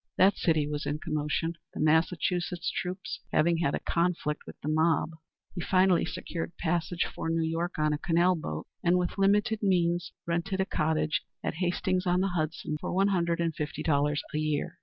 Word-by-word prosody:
That 195 +2 +5
city 160 -4 +2
was 150 0 -3
in 145 - -1
commotion, 155 +2 -2 0.2
the - - -5
Massachusetts 170 +2 +1
troops 185 +1 -4
having 170 +2 +3
had 165 -4 +1
a - - -2
conflict 170 -3 -1
with - - -10
the - - -5
mob. 160 +1 +2 0.4
He 175 - -4
finally 185 0 +3
secured 170 0 -5
passage 175 +1 0
for 165 - -4
New 165 0 +1
York 170 +2 -2
on 155 -1 +2
a 150 - -2
canal 175 +2 +3
boat, 80 - -5 0.2
and 175 +1 +4
with 180 +2 -2
limited 205 +2 +3
means 175 -3 +1
rented 170 +4 -1
a 190 - +2
cottage 155 -3 0 0.2
at - - -1
Hastings 180 +1 0
on 180 +1 +3
the 195 - +1
Hudson, 155 -3 -2
for - - -3
one 195 +2 +3
hundred 170 -3 +1
and 165 -1 0
fifty 150 0 -4
dollars 145 -1 +1
a 150 - 0
year. 155 -1 -2
170 Hz, 185 wpm, -29 LUFS, 155-180 Hz, 0.4 s, That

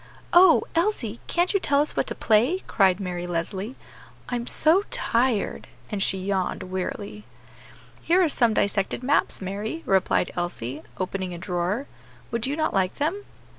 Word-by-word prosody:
"Oh! 350 -1 +7
Elsie, 330 - 0
can't 350 +3 +1
you 395 - +3
tell 280 -5 +2
us 295 - 0
what - - 0
to - - -4
play?" 245 - +2
cried 190 -3 +3
Mary 175 -2 -4
Leslie; 185 +7 -3 0.5
"I'm 245 -1 -3
so 325 +5 +4
tired," 235 -3 0 0.2
and 205 -2 -2
she 195 - +1
yawned 190 -1 -2
wearily. 200 +3 -5 0.8
"Here 360 +3 +3
are - - +4
some 235 -6 +2
dissected 200 +4 0
maps, 275 -6 +1
Mary," 210 - -4
replied 190 -1 +2
Elsie, 155 -6 -4 0.2
opening 185 -1 -3
a - - -7
drawer; 180 +7 -2 0.5
"would 235 +1 -1
you 280 - -1
not 310 - 0
like 190 -1 +1
them?" 340 +8 -2
210 Hz, 155 wpm, -25 LUFS, 185-285 Hz, 0.8 s, Oh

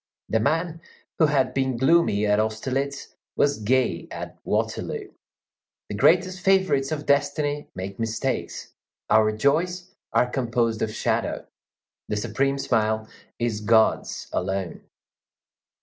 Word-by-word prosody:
The 110 - +2
man 165 +7 0 0.4
who 160 - +6
had 140 -3 +1
been 130 -2 0
gloomy 130 -6 +3
at 105 0 +3
Austerlitz 130 +6 -2 0.2
was 145 -4 +2
gay 125 +4 +1
at - - -7
Waterloo. - - -2 0.8
The 105 - -4
greatest 185 - +3
favorites 190 -8 +2
of 150 -1 -3
destiny 145 +1 +1
make 95 +2 -6
mistakes. 115 -1 -3 0.4
Our 110 -1 +5
joys 175 +11 0 0.2
are - - +3
composed 120 -3 -1
of 110 - 0
shadow. - - -1 0.6
The 105 - -2
supreme 135 +6 0
smile 110 -4 0 0.3
is 115 -3 -1
God's 110 +1 +2
alone. 95 -1 -2
130 Hz, 120 wpm, -24 LUFS, 110-145 Hz, 0.8 s, who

